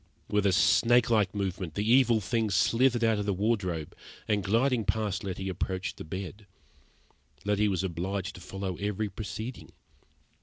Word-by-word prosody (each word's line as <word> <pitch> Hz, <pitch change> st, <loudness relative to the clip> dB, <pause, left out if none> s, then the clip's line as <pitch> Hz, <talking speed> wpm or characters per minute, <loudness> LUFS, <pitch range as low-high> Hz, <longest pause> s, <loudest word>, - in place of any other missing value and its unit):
With 105 Hz, -1 st, +2 dB
a -, -, +4 dB
snakelike 115 Hz, +1 st, +3 dB
movement, 95 Hz, -4 st, -3 dB
the 105 Hz, +1 st, -1 dB
evil 120 Hz, -2 st, +5 dB
thing 110 Hz, +1 st, -1 dB
slithered 120 Hz, +4 st, +3 dB
out 110 Hz, -2 st, +3 dB
of 100 Hz, -, -3 dB
the 100 Hz, -, +1 dB
wardrobe, 95 Hz, -7 st, -1 dB, 0.3 s
and, 105 Hz, -2 st, +1 dB
gliding 115 Hz, +4 st, +2 dB
past 105 Hz, -3 st, -1 dB
Letty, 95 Hz, 0 st, -4 dB
approached 95 Hz, 0 st, -3 dB
the -, -, -7 dB
bed. 95 Hz, +5 st, -7 dB, 1.0 s
Letty 105 Hz, +1 st, +2 dB
was 95 Hz, -2 st, 0 dB
obliged 95 Hz, +2 st, -3 dB
to 90 Hz, -, -12 dB
follow 95 Hz, 0 st, -5 dB
every 105 Hz, +1 st, -2 dB
proceeding. 110 Hz, +5 st, -7 dB
100 Hz, 150 wpm, -29 LUFS, 95-110 Hz, 1.0 s, evil